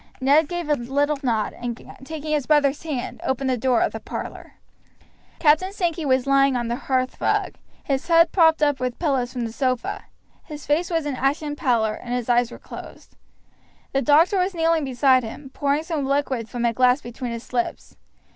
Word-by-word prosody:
Ned 285 Hz, +4 st, +4 dB
gave 350 Hz, -2 st, -3 dB
a 300 Hz, -, +3 dB
little 285 Hz, +3 st, 0 dB
nod, 230 Hz, -6 st, 0 dB
and, 240 Hz, -1 st, -5 dB, 0.2 s
taking 310 Hz, +1 st, -6 dB
his 295 Hz, -3 st, 0 dB
brother's 290 Hz, -2 st, +3 dB
hand, 290 Hz, -7 st, -5 dB
opened 265 Hz, 0 st, -1 dB
the -, -, +2 dB
door 250 Hz, 0 st, +1 dB
of -, -, +1 dB
the -, -, -6 dB
parlor. -, -, -7 dB, 0.8 s
Captain 330 Hz, +5 st, +3 dB
Sankey 345 Hz, -5 st, -2 dB
was 260 Hz, -1 st, +2 dB
lying 275 Hz, -1 st, +3 dB
on 240 Hz, -1 st, -2 dB
the 235 Hz, -, 0 dB
hearth 255 Hz, -1 st, -2 dB
rug, -, -, +1 dB, 0.3 s
his 270 Hz, -1 st, -2 dB
head 335 Hz, -1 st, +5 dB
propped 320 Hz, -4 st, +4 dB
up 290 Hz, -3 st, +2 dB
with 250 Hz, -1 st, -3 dB
pillows 270 Hz, -7 st, 0 dB
from 245 Hz, -2 st, -3 dB
the 225 Hz, -, -5 dB
sofa; 255 Hz, -2 st, -2 dB, 0.4 s
his 300 Hz, -2 st, -9 dB
face 320 Hz, +4 st, +1 dB
was 330 Hz, -3 st, -1 dB
an 290 Hz, -3 st, -2 dB
ashen 290 Hz, +3 st, -1 dB
pallor, 230 Hz, -6 st, +1 dB
and 245 Hz, 0 st, -3 dB
his 245 Hz, -1 st, -3 dB
eyes 240 Hz, -1 st, +3 dB
were -, -, -10 dB
closed. -, -, -12 dB, 0.8 s
The 270 Hz, -, +2 dB
doctor 320 Hz, +8 st, +4 dB
was 365 Hz, +1 st, 0 dB
kneeling 325 Hz, -2 st, +2 dB
beside 260 Hz, 0 st, +3 dB
him, 265 Hz, +4 st, -8 dB
pouring 285 Hz, +2 st, 0 dB
some 320 Hz, -3 st, -2 dB
liquid 270 Hz, -4 st, -1 dB
from 240 Hz, -1 st, -2 dB
a 235 Hz, -, +2 dB
glass 250 Hz, +2 st, +3 dB
between 240 Hz, +1 st, -6 dB
his 230 Hz, +2 st, -8 dB
lips. 240 Hz, -1 st, -3 dB
275 Hz, 195 wpm, -23 LUFS, 250-305 Hz, 0.8 s, head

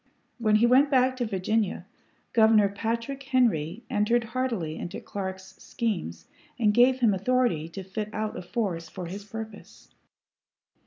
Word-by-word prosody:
When 215 Hz, -2 st, +3 dB
he 220 Hz, +3 st, +5 dB
went 260 Hz, +4 st, +5 dB
back 260 Hz, -1 st, +3 dB
to 245 Hz, -2 st, -1 dB
Virginia, 205 Hz, +1 st, -1 dB, 0.5 s
Governor 220 Hz, -3 st, +5 dB
Patrick 230 Hz, +6 st, -3 dB
Henry 235 Hz, -, +1 dB
entered 225 Hz, +3 st, +1 dB
heartily 230 Hz, -10 st, -2 dB
into 175 Hz, -, -5 dB
Clark's 190 Hz, -1 st, -6 dB
schemes 85 Hz, -, -3 dB, 0.3 s
and 215 Hz, -4 st, +3 dB
gave 255 Hz, +3 st, +4 dB
him 225 Hz, -4 st, +4 dB
authority 200 Hz, -6 st, +1 dB
to 190 Hz, +3 st, -7 dB
fit 210 Hz, +3 st, -5 dB
out 215 Hz, 0 st, -3 dB
a -, -, -5 dB
force 175 Hz, -3 st, -3 dB
for 185 Hz, -3 st, -7 dB
his 195 Hz, +4 st, -7 dB
purpose. 220 Hz, +1 st, -9 dB
215 Hz, 145 wpm, -27 LUFS, 190-240 Hz, 0.5 s, he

